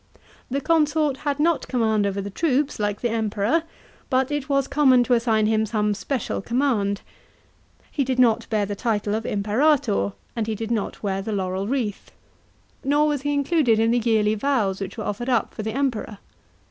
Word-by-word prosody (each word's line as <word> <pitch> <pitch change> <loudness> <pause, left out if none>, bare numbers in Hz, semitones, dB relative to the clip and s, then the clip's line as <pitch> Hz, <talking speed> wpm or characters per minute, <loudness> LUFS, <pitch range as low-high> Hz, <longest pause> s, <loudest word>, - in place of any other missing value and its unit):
The 275 +2 -1
consort 305 -3 +2
had 285 0 -2
not 330 +1 +1
command 220 -4 +1
over 200 0 -2
the 200 +1 -6
troops, 285 - 0
like 205 -1 -1
the 240 - 0
Emperor, 220 +6 +1 0.5
but 260 +1 +1
it 290 -1 -3
was 275 -1 +2
common 275 -3 +4
to 245 - +1
assign 230 -2 +2
him 220 0 +1
some 210 -1 0
special 260 +3 -3
command. 230 -4 0 0.9
He 285 - 0
did 260 -1 -1
not 235 -3 +3
bear 215 -2 +1
the 205 +1 -4
title 210 -1 -1
of 220 +1 -2
Imperator, 210 - +1 0.2
and 225 -2 -2
he 220 - -1
did 225 +2 -5
not 220 -2 -2
wear 195 -1 -1
the 215 +2 -4
laurel 190 0 -2
wreath. 235 -5 -2 0.7
Nor 295 +2 +3
was 290 -3 -1
he 290 +1 -1
included 285 -4 +2
in 225 +1 +3
the 245 - +3
yearly 220 -2 +2
vows 215 -5 0
which 195 +2 -5
were 215 - -4
offered 225 +6 -3
up 240 -5 +1
for - - -5
the 220 0 -3
Emperor. 245 -5 -2
230 Hz, 185 wpm, -23 LUFS, 210-275 Hz, 0.9 s, common